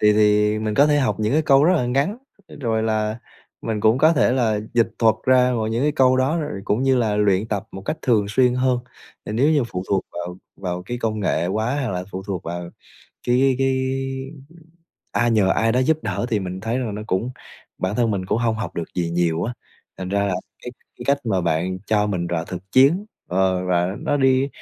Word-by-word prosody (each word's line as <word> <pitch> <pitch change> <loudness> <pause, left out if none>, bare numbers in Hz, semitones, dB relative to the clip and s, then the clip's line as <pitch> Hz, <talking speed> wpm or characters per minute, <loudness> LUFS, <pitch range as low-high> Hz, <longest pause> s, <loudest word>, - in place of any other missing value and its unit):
thì 105 0 +5
thì 105 0 +3
mình 110 -1 -2
có 145 +2 +5
thể 145 -1 +3
học 130 - +1
những 105 +1 0
cái 155 +2 +3
câu 140 -2 +5
rất 180 - +5
là 125 -6 0
ngắn, 140 - 0 0.4
rồi 110 -3 0
là 110 0 -1 0.4
mình 110 -2 -2
cũng 110 +4 +3
có 155 +3 +5
thể 130 - +3
là 110 -5 +1
dịch 115 -1 +3
thuật 115 -2 +4
ra 125 -1 +4
và 110 - -1
những 115 +3 -1
cái 150 - +2
câu 130 -3 +4
đó 135 +6 +1
rồi 150 -10 -4
cũng 110 +5 0
như 135 -1 +3
là 110 -4 +1
luyện 105 0 +2
tập 100 -2 -2
một 95 - -8
cách 155 - -3
thường 110 -6 +2
xuyên 125 +3 +3
hơn, 125 0 +1 0.5
nên 105 - -3
nếu 140 +5 +3
như 145 -5 +2
phụ 90 -6 -5
thuộc 95 -2 +1
vào 90 +1 -5 0.2
vào 90 -2 -4
cái 120 +6 -5
công 110 -2 -2
nghệ 85 -4 0
quá 110 +8 -1
hoặc - - -2
là 90 -1 -3
phụ 95 +1 -5
thuộc 95 -4 -3
vào 85 +1 -5 0.6
cái 130 +2 +3
cái 130 -1 +1 1.3
ai 120 0 +2
nhờ 105 -4 +3
ai 115 +3 +2
đó 125 - +2
giúp 155 +3 +2
đỡ - - -2
thì 110 -3 +1
mình 95 0 -5
thấy 115 +4 -2
rằng 115 -5 -3
nó 105 - -5
cũng 110 +6 -1 0.5
bản 95 +3 -2
thân 120 -2 +2
mình 95 -2 -2
cũng 110 - 0
hông 115 -1 +1
học 100 -6 -5
được 85 - -2
gì 85 -2 -1
nhiều 85 -1 0
á. 120 - -2 0.5
Thành 95 -1 -5
ra 100 +1 0
là 95 - 0 0.3
cái 125 - -6 0.3
cái - - -9
cách 140 0 +3
mà 95 -4 +1
bạn 85 +2 -1
cho 105 -1 +2
mình 90 -4 -2
rào 85 -1 -2
thực 95 +2 -9
chiến, 150 +10 +4 0.2
ờ, 95 0 +1
và 90 +2 0
nó 145 - 0
đi 135 0 +3
110 Hz, 230 wpm, -22 LUFS, 95-130 Hz, 1.3 s, thì